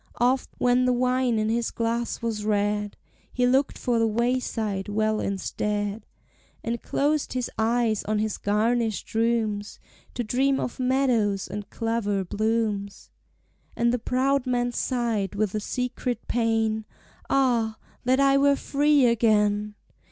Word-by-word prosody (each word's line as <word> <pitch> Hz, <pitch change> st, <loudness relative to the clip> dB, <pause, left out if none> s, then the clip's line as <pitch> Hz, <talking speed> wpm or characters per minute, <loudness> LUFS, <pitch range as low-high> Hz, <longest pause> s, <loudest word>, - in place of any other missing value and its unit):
Oft, 250 Hz, +2 st, +1 dB
when 250 Hz, +1 st, +3 dB
the 250 Hz, -, +3 dB
wine 250 Hz, -1 st, +1 dB
in 215 Hz, 0 st, 0 dB
his 230 Hz, +1 st, 0 dB
glass 235 Hz, +1 st, -2 dB
was 220 Hz, -2 st, -2 dB
red, 205 Hz, 0 st, 0 dB, 0.3 s
He 250 Hz, -, +1 dB
longed 265 Hz, +3 st, +2 dB
for 240 Hz, -2 st, 0 dB
the 225 Hz, -, +3 dB
wayside 225 Hz, -3 st, -1 dB
well 215 Hz, +1 st, +1 dB
instead, 205 Hz, +2 st, -2 dB, 0.6 s
And 235 Hz, 0 st, -3 dB
closed 295 Hz, +1 st, 0 dB
his 255 Hz, -2 st, -2 dB
eyes 225 Hz, -1 st, +1 dB
on 215 Hz, +1 st, 0 dB
his 215 Hz, 0 st, -1 dB
garnished 220 Hz, 0 st, 0 dB
rooms, 220 Hz, -2 st, 0 dB, 0.4 s
To 245 Hz, -, -1 dB
dream 265 Hz, +5 st, +1 dB
of 245 Hz, -, -4 dB
meadows 250 Hz, -6 st, +1 dB
and 205 Hz, +1 st, -6 dB
clover 220 Hz, -4 st, -1 dB
blooms; 215 Hz, -1 st, -2 dB, 0.6 s
And 235 Hz, 0 st, +2 dB
the 250 Hz, -, 0 dB
proud 265 Hz, +3 st, 0 dB
man 245 Hz, -1 st, 0 dB
sighed 230 Hz, -6 st, -1 dB
with 205 Hz, -1 st, 0 dB
a 215 Hz, -, 0 dB
secret 250 Hz, +2 st, -3 dB
pain, 225 Hz, -2 st, 0 dB, 0.4 s
"Ah, 235 Hz, -5 st, +2 dB, 0.3 s
that 255 Hz, +2 st, +2 dB
I 275 Hz, 0 st, +4 dB
were 280 Hz, 0 st, +4 dB
free 290 Hz, 0 st, +3 dB
again! 210 Hz, -3 st, +2 dB
230 Hz, 135 wpm, -25 LUFS, 210-250 Hz, 0.6 s, I